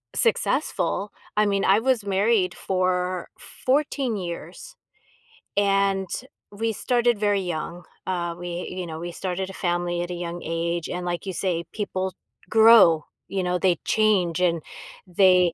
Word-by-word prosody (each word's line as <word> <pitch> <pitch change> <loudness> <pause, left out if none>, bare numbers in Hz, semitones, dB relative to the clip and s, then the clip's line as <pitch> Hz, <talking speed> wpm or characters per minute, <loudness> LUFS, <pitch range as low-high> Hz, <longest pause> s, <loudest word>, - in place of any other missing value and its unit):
successful. 210 - 0 0.3
I 210 - +5
mean, 200 -1 +1
I 195 +3 +5
was 245 -3 +1
married 195 -2 +2
for 185 -1 -1 0.4
14 270 -3 +1
years, 185 - -7 0.8
and 195 -1 +2 0.4
we 225 +2 -1
started 240 0 +1
very 205 -2 +2
young. 175 0 -4 0.2
Um, 175 -2 -2
we, 175 0 -5
you 180 -1 -5
know, 160 -1 -6
we 175 +1 -5
started 185 +2 -3
a 195 - -8
family 175 -1 -1
at 175 - -4
a - - -2
young 175 0 -5
age, 170 0 -2
and 180 0 -4
like 175 +2 -3
you 190 - -2
say, 170 -2 -1
people 190 -3 -3 0.4
grow. 220 -8 +7 0.2
You 195 -1 -1
know, 180 0 0
they 180 -2 +2
change, 190 -6 +2
and 170 -2 +2 0.5
they 180 -1 +4
185 Hz, 145 wpm, -24 LUFS, 175-205 Hz, 0.8 s, grow